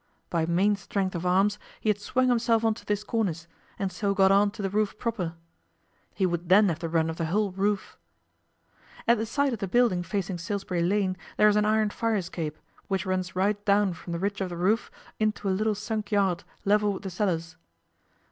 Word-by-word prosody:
By 165 -2 +1
main 190 +5 +3
strength 195 -2 -2
of 175 0 -2
arms 195 +3 +3 0.2
he - - -6
had 205 - -3
swung 255 +5 +1
himself 230 -2 +2
on 225 - +3
to - - -13
this 210 0 0
cornice, 190 -8 -1 0.3
and 195 -2 -2
so 200 +2 -1
got 195 -1 +5
on 200 +1 +5
to 205 0 -7
the 195 - 0
roof 210 0 0
proper. 195 -8 -3 0.8
He 195 - +1
would 175 -1 -2
then 200 +2 +6
have 165 -2 -2
the 165 - -3
run 160 -1 +2
of 165 0 -4
the 165 - -1
whole 200 +4 +1
roof. 200 +2 -2 1.1
At 235 -1 +5
the 220 - -2
side 280 +3 +1
of 225 - -4
the 195 - -2
building 230 -3 +3
facing 185 0 -3
Salisbury 185 0 -2
Lane 185 +1 +1 0.2
there 210 - +6
is 210 - +2
an 210 0 +3
iron 215 0 +2
fire 230 +1 0
escape, 170 -5 -3 0.3
which 195 0 -1
runs 185 -1 -2
right 205 +2 +1
down 200 -2 +3
from 170 +1 -9
the 170 - -2
ridge 200 +1 -2
of 190 - -1
the 175 - -6
roof 205 +6 +1 0.3
into 215 -1 0
a - - +2
little 215 +2 +1
sunk 215 +1 -4
yard 195 -4 +2 0.2
level 210 0 +3
with 195 - -7
the 190 - -5
cellars. 165 -4 -1
200 Hz, 215 wpm, -27 LUFS, 180-210 Hz, 1.1 s, then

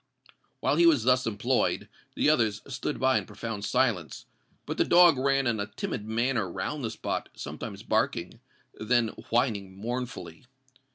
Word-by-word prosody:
While 145 - +2
he 170 0 +6
was 145 -9 +4
thus 125 0 +3
employed, 115 +4 0 0.3
the - - +1
others 110 -8 +2
stood 135 +2 -4
by 130 0 +3
in - - -9
profound 110 -3 -5
silence; 115 -11 0 0.4
but - - -4
the - - +6
dog 175 -2 +6
ran 135 0 +2
in 115 -3 0
a 100 - -2
timid 105 +1 -5
manner 115 -3 0
round 130 - -4
the 115 - -1
spot, 110 - -4
sometimes - - -7
barking—then 115 +1 -1 0.2
whining 105 -6 0
mournfully. 125 +4 -5
120 Hz, 150 wpm, -28 LUFS, 110-130 Hz, 0.4 s, he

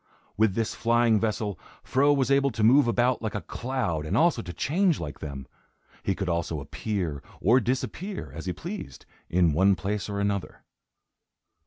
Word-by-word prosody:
With 105 -3 +2
this 115 -1 -1
flying 115 -1 +3
vessel, 105 -4 -2 0.2
Fro 140 +3 +3
was 135 -2 +2
able 140 0 +4
to 110 - -1
move 125 +4 +6
about 120 +1 +2
like 110 -2 -3
a 105 - -2
cloud 120 -12 -2
and 75 - -1
also 170 +2 +3
to 90 - -7
change 170 - +1
like 75 -3 -6
them. 70 -3 -6 0.6
He 95 - -1
could 95 - -3
also 85 -2 -1
appear, 80 0 -3 0.2
or 120 +7 +5
disappear, 130 - -3
as - - -7
he - - 0
pleased, 170 - -7 0.2
in 85 -3 +3
one 95 +5 +4
place 100 +5 -3
or 100 0 -3
another. 100 -1 -2
105 Hz, 170 wpm, -27 LUFS, 90-130 Hz, 0.6 s, move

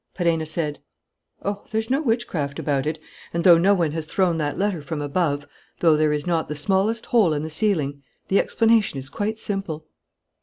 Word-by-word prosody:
Perenna 165 -3 +1
said: 155 -2 -2 0.7
"Oh, 200 0 -2
there's 220 +2 -1
no 275 +3 +2
witchcraft 200 - -1
about 140 -1 -1
it; 155 +1 -1 0.4
and, 170 - 0
though 175 -3 +8
no 195 +4 +4
one 170 -5 +1
has 155 0 -4
thrown 180 -2 +1
that 145 -1 -2
letter 195 -5 0
from 150 +2 -5
above, 145 -1 -1 0.3
though 165 -3 +5
there 155 0 +2
is 150 -1 -1
not 170 -2 0
the 150 - -4
smallest 195 +8 +1
hole 210 -10 +3
in 150 0 -2
the 160 - -5
ceiling, 150 -6 0 0.3
the 195 - +3
explanation 225 -8 +2
is 135 0 -5
quite 215 +1 -2
simple!" 195 -8 -3
165 Hz, 190 wpm, -23 LUFS, 150-200 Hz, 0.7 s, though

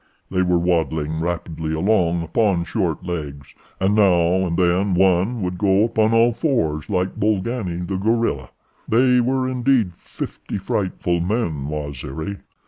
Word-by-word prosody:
They 95 -1 +1
were 90 -1 +2
waddling 80 -3 0
rapidly 80 -2 -3
along 85 -2 +1
upon 95 0 +1
short 90 -3 -2
legs, 75 -5 -6 0.3
and 95 +2 +2
now 95 -3 +3
and 85 -1 -2
then 90 +1 +2
one 95 +5 +2
would 90 0 -3
go 100 0 +3
upon 110 -1 +2
all 115 +1 +4
fours 80 - -1
like 95 +1 -1
Bolgani, 100 -4 -1
the 95 - -2
gorilla. 110 - 0 0.4
They 125 +2 +4
were 130 +1 0
indeed 125 -6 +1
fifty 85 - -7
frightful 95 -3 -1
men, 85 - -1
Waziri." 75 +4 -5
90 Hz, 135 wpm, -21 LUFS, 85-110 Hz, 0.4 s, all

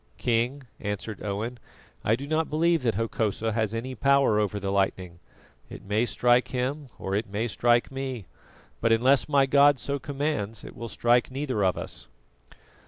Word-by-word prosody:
"King," 125 +4 0 0.2
answered 105 +1 -5
Owen, 110 +4 -4 0.4
"I 110 - +3
do 135 +4 -7
not 155 +2 0
believe 165 +1 +2
that 115 -5 0
Hokosa 110 0 -1
has 110 0 -1
any 125 +3 -4
power 135 -4 +3
over 105 -1 -1
the 100 0 -3
lightning. 95 -3 -1 0.5
It - - -10
may 105 +4 +1
strike 120 +1 +3
him 135 +3 -3
or 95 - -4
it 105 +1 -1
may 105 +4 -1
strike 120 +2 +2
me; 135 -6 -5 0.5
but 115 - +1
unless 130 +6 +4
my 140 -2 +4
God 140 +1 +5
so 140 +2 -2
commands, 135 -7 -3
it - - -10
will 115 0 -6
strike 120 +2 +2
neither 130 -5 -2
of 95 -1 +2
us." - - -6
120 Hz, 170 wpm, -26 LUFS, 105-135 Hz, 0.5 s, God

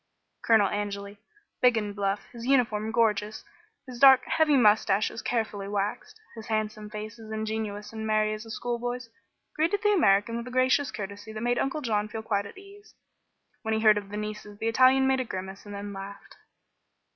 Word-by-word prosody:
Colonel 220 -3 +5
Angeli, 200 0 -4 0.4
big 245 -2 +5
and 205 -2 -3
bluff, 200 0 -1
his 235 0 -7
uniform 225 -5 +2
gorgeous, 215 -2 0 0.4
his 250 -3 -9
dark, 265 -1 +7
heavy 305 -3 +3
moustaches 210 -1 +3
carefully 215 -4 -2
waxed, 210 - -3 0.2
his 225 -1 -9
handsome 215 -1 -2
face 215 +2 -7
as 220 -1 -11
ingenuous 215 -1 -4
and 220 0 -5
merry 215 0 +2
as 215 +1 -6
a 225 - -13
schoolboy's, 245 +1 -4 0.5
greeted 340 +7 0
the 420 0 +4
American 220 - +3
with 235 +1 -6
a - - -5
gracious 255 +2 +2
courtesy 205 +1 -7
that 215 0 -6
made 245 +1 +1
Uncle 270 +3 -1
John 215 -5 0
feel 220 +1 -6
quite 200 -2 -1
at - - -13
his 390 - -12
ease. 410 +1 -17 0.7
When 220 -1 -1
he 220 - -1
heard 215 -1 +5
of 200 -1 -12
the 210 - -5
nieces 210 -1 -6
the 225 - -3
Italian 260 +3 +5
made 265 0 +2
a - - 0
grimace 190 -2 -7
and 205 - -7
then 200 0 -6
laughed. 195 +1 -9
220 Hz, 190 wpm, -27 LUFS, 205-245 Hz, 0.7 s, dark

